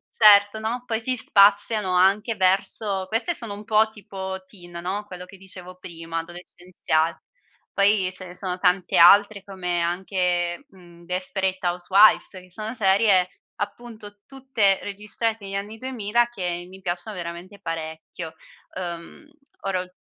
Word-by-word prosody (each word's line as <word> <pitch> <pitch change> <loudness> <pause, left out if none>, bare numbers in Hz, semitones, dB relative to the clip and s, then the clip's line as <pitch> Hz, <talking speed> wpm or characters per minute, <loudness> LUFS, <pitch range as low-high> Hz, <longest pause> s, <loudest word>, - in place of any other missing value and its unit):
certo, 205 0 +6
no, 235 +3 -3
poi 225 -2 -1
si 255 +2 -2
spaziano 205 -2 +3
anche 200 +5 +3
verso 190 +1 0
queste 230 - -1
sono 230 -9 -7
un 205 - -10
po' 220 0 +3
tipo 190 -2 -7
teen 175 -3 -16
no, 195 +4 -4
quello 180 -2 -9
che 195 +1 -15
dicevo 185 -1 -12
prima, 165 -2 -6
adolescenziale. 175 -1 -3 0.5
Poi 200 -2 +3
ce 185 0 -8
ne 180 - -11
sono 180 0 -4
tante 180 0 +1
altre 200 +3 +6
come 180 -3 -3
anche, 175 +3 -1
mhmm, 175 -5 -18
Desperate 185 +1 -2
Housewifes, 185 +4 +4
che 185 -2 -13
sono 220 +4 -5
serie 195 -3 +3 0.3
appunto 215 -1 -7
tutte 255 -8 +1
registrate 210 +2 -4
negli 195 - -7
anni 205 +3 -5
2000 235 -2 0
che 175 -6 -4
mi 190 +1 -14
piacciono 180 +3 -4
veramente 175 +3 -8
parecchio. 160 -1 -6 0.4
Uhm, 175 - -7 0.4
ora 190 -2 -1
ul 180 0 -12
190 Hz, 140 wpm, -24 LUFS, 180-210 Hz, 0.5 s, certo